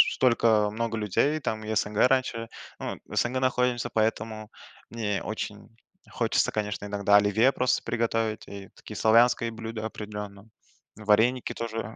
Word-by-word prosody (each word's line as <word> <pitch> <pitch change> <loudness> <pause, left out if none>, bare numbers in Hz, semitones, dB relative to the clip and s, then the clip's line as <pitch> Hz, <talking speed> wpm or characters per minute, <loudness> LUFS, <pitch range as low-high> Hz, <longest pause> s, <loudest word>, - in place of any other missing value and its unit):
столько 115 -4 +3
много 115 +1 -2
людей. 110 +9 +1
Там 110 -6 -3
и 110 +1 -3
СНГ 105 -1 -1
раньше, 125 -3 0 0.3
ну - - -4
вот - - -8
в - - -9
СНГ 125 +2 +1
находимся, 125 -2 +1
поэтому 110 -1 -2 0.4
мне 105 -4 -2
очень 105 -1 -6 0.4
хочется, - - +1
конечно, 105 -1 -3
иногда 100 0 +2
оливье 105 +5 +4
просто 125 - +1
приготовить. 115 -2 -1
И 100 -1 -9
такие - - -10
славянские 115 +1 +4
блюда, 110 -1 -6
определенно, 105 -1 -7 0.5
вареники 110 +4 +2
тоже 115 -1 -5
110 Hz, 140 wpm, -27 LUFS, 105-115 Hz, 0.5 s, оливье